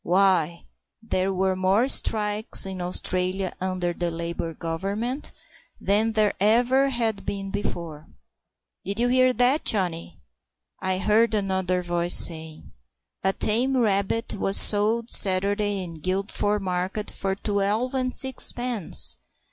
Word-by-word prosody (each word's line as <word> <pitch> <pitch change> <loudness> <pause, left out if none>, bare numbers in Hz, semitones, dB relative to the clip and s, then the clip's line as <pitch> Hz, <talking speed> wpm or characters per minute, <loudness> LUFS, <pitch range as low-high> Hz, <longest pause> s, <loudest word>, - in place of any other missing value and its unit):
Why, 175 -3 +1 0.4
there 190 -3 -1
were 190 0 -1
more 190 +6 +1
strikes 210 -5 +2
in 190 -1 -6
Australia 185 +1 -2
under 185 -2 -2
the 175 0 -3
Labour 170 0 -5
Government 200 - -5 0.5
than 215 +3 0
there 215 -1 +1
ever 245 +6 +2
had 230 -5 -2
been 195 -1 -5
before." 165 -6 -6 0.8
"Did 200 +4 -4
you 245 +1 +1
hear 255 0 +3
that, 250 +5 +2
Johnny?" 175 -5 -1 0.6
I 190 -1 -1
heard 220 +3 +1
another 190 -3 -1
voice 175 0 +2
saying. 160 -1 +2 0.5
"A 190 - +2
tame 245 +7 0
rabbit 210 0 -1
was 195 -1 +1
sold 220 +3 +4
Sat'day 200 +1 +3
in 165 -3 -10
Guildford 200 +3 -1
market 185 +3 -4
for 195 0 -3
twelve 205 +5 -2
and 255 -1 -2
sixpence!" 245 - +2
195 Hz, 125 wpm, -23 LUFS, 185-220 Hz, 0.8 s, sold